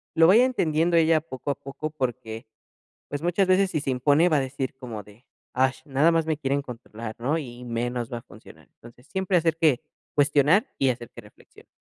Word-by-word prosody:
lo 165 - +6
vaya 205 +8 +7
entendiendo 170 -8 +1
ella 160 -1 +4
poco 145 -2 -5
a - - -2
poco 140 +4 -6
porque, 125 -5 -4 0.6
pues, 145 +1 -5
muchas 175 +3 +2
veces 185 +1 +3
si 155 - -1
se 140 - -2
impone 145 +6 +3
va 155 -3 +3
a - - +2
decir 135 0 -4
como 120 -6 -8
de: 105 +4 -19 0.3
"Ash, 130 +1 +1
nada 145 +3 +3
más 165 -1 +1
me 160 -1 0
quieren 140 -1 -1
controlar", 115 -3 -8
¿no? 140 +7 0
Y 150 - -5
y - - -9
menos 120 +1 -3
va 120 - -2
a - - -13
funcionar. - - -16
Entonces, 120 +2 -17
siempre 190 +1 0
hacer 165 -2 +2
que 155 -7 +3 0.3
cuestionar, 145 +7 +4
y 135 - +3
hacer 120 -2 -3
que - - -11
reflexione. - - -19
140 Hz, 210 wpm, -25 LUFS, 125-165 Hz, 0.6 s, vaya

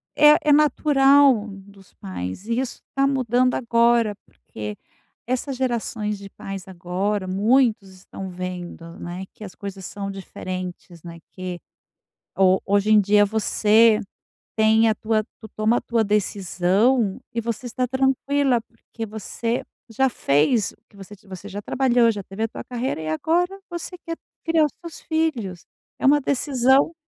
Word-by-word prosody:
é 300 0 +7
é 300 - +2
natural 280 -5 +4
dos 195 0 -14
pais 95 - -6
e 235 +2 0
isso 260 -2 -4
tá 275 0 +3
mudando 255 -2 +1
agora, 235 -2 +2
porque 105 -1 -8 0.5
essas 255 +2 -2
gerações 225 -4 -2
de 200 0 -10
pais 195 0 -8
agora 190 +2 -2
muitos 215 +1 +2
estão 190 +1 -9
vendo, 180 -2 -7
né, 175 +2 -6
que - - -16
as 190 - -9
coisas 195 -2 -8
são 200 +1 -5
diferentes, 185 -3 -7
né, 170 -1 -9
que 180 -2 -6 0.8
ho 190 -1 +4
hoje 200 +1 +2
em 215 - +7
dia 205 +1 +4
você 220 +1 +3 0.6
tem 220 +1 +4
a - - +3
tua 215 0 0 0.2
tu 220 - -10
toma 215 +3 +1
a - - -2
tua 230 -1 0
decisão 200 +2 +1
e 230 - -1
você 230 +2 -4
está 250 +1 -2
tranquila, 265 0 +1
porque 225 0 -9
você 220 +2 -3 0.3
já 265 +4 +2
fez 155 - +2
o - - -22
que - - -23
você 200 +1 -11
ti 195 - -25
você 190 +1 -9
já 205 +1 -6
trabalhou, 245 0 +3
já 205 -3 -6
teve 195 +4 -5
a - - +1
tua - - -8
carreira 250 -4 -3
e 155 - -5
agora 345 - 0
você 345 +1 -6
quer 330 - -3 0.3
criar 325 -2 +3
os 295 - -3
seus 335 -3 -9
filhos. 260 - -2 0.3
É - - -3
uma 290 +2 +6
decisão. 270 +1 +2
220 Hz, 155 wpm, -23 LUFS, 195-255 Hz, 0.8 s, é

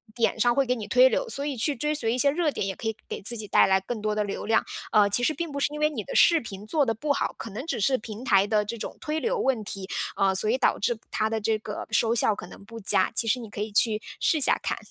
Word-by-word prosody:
点 230 -1 0
上 240 +1 +3
会 275 +1 +2
给 250 0 0
你 220 -4 -7
推 255 +1 +5
流， - - -1
所 280 - -3
以 285 -3 -3
去 285 +5 +1
追 300 +5 -1
随 230 -6 -1
一 250 - -1
些 280 +2 +4
热 320 -1 0
点 205 - -3
也 195 -1 -3
可 225 - -6
以 220 - -2
给 - - -6
自 235 +5 -3
己 210 -1 -6
带 - - +5
来 190 0 +3
更 220 +2 -5
多 215 0 -1
的 210 - 0
流 200 - -5
量。 225 +1 +2 0.3
呃， 205 -1 +4
其 245 +4 0
实 310 - +2
并 330 +1 -5
不 280 - -4
是 290 - 0
因 300 - -5
为 305 - +3
你 240 -9 -5
的 - - -7
视 335 -1 +6
频 205 -6 -9
做 290 +2 +1
的 225 - 0
不 285 +7 -3
好， - - -2
可 230 - -7
能 225 +8 -7
只 330 - -3
是 260 +5 +2
平 220 +2 -9
台 195 -5 +4
的 210 -1 +1
这 230 +3 -5
种 - - -7
推 305 +1 -2
流 465 +6 -1
问 260 - 0
题， 195 -1 -7 0.3
呃， 195 -1 +2
所 215 +3 0
以 245 - +2
导 265 - +2
致 235 +2 0
它 215 0 0
的 220 -1 -2
这 220 +1 +1
个 210 -1 -7
收 225 0 +2
效 215 -2 +3
可 175 - -9
能 200 - -13
不 230 +2 -10
佳， 190 -2 +3
其 230 - +1
实 250 +3 +2
你 225 -3 -9
可 205 - -9
以 215 - -4
去 215 +1 +3 0.2
试 320 - +2
一 - - -3
下 - - +6
看。 - - -2
225 Hz, 335 characters per minute, -26 LUFS, 210-275 Hz, 0.3 s, 视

